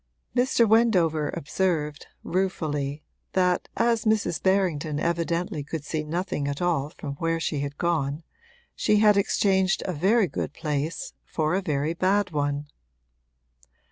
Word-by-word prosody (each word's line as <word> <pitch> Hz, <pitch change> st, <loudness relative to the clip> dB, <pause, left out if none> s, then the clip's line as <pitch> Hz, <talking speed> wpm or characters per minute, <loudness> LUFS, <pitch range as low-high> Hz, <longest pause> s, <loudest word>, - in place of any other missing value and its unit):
Mr. 245 Hz, -2 st, +3 dB
Wendover 180 Hz, -10 st, +3 dB
observed, 150 Hz, -2 st, -1 dB, 0.2 s
ruefully, 155 Hz, -6 st, -2 dB, 0.3 s
that 180 Hz, -1 st, +1 dB
as 230 Hz, -2 st, +2 dB
Mrs. 215 Hz, -6 st, +1 dB
Berrington 170 Hz, -6 st, +1 dB
evidently 170 Hz, -1 st, -1 dB
could 150 Hz, +1 st, -5 dB
see 155 Hz, +1 st, -2 dB
nothing 160 Hz, -2 st, -2 dB
at 140 Hz, 0 st, -3 dB
all 165 Hz, -5 st, 0 dB
from 150 Hz, -3 st, -7 dB
where 165 Hz, +1 st, 0 dB
she 155 Hz, -3 st, -1 dB
had 145 Hz, 0 st, -4 dB
gone 155 Hz, -3 st, -1 dB, 0.5 s
she 210 Hz, -, +2 dB
had 210 Hz, 0 st, +6 dB
exchanged 190 Hz, -1 st, +2 dB
a 185 Hz, -, -2 dB
very 195 Hz, +8 st, +3 dB
good -, -, -4 dB
place 150 Hz, 0 st, -3 dB
for 155 Hz, 0 st, -1 dB
a 190 Hz, -, +1 dB
very 150 Hz, -3 st, -1 dB
bad 190 Hz, +2 st, +1 dB
one. 145 Hz, -1 st, -1 dB
170 Hz, 135 wpm, -26 LUFS, 150-190 Hz, 0.5 s, had